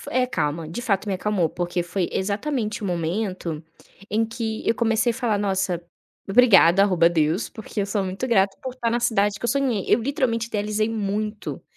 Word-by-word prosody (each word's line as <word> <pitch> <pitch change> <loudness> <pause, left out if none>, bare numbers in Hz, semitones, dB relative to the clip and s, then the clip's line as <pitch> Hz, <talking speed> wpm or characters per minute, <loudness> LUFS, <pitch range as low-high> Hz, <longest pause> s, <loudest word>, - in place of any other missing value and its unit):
f - - -10
é, 255 0 +2
acalma. 160 -9 -2
De 175 +9 -5
fato 205 -2 0
me 195 - 0
acalmou, 185 -3 0
porque 175 +1 -2
foi 175 +1 -2
exatamente 215 +3 -2
o - - -2
momento 175 -2 -2 0.5
em 220 +2 +2
que 225 -1 -4
eu - - +3
comecei 230 +1 +1
a - - -10
falar: 230 -5 0
"Nossa, 190 -3 -1 0.5
obrigada, 195 -5 +6
arroba 180 -4 +4
Deus", 165 +3 0
porque 220 -1 -6
eu 200 - 0
sou 200 0 -1
muito 190 +7 -3
grata 195 -4 +2
por 260 -1 -5
estar 240 -3 -1
na 240 +1 0
cidade 205 -3 +1
que - - -12
eu 235 - +1
sonhei. 255 -7 0
Eu - - +4
literalmente 235 -3 -1
idealizei 215 0 -1
muito 210 -1 -3
205 Hz, 195 wpm, -23 LUFS, 185-230 Hz, 0.5 s, obrigada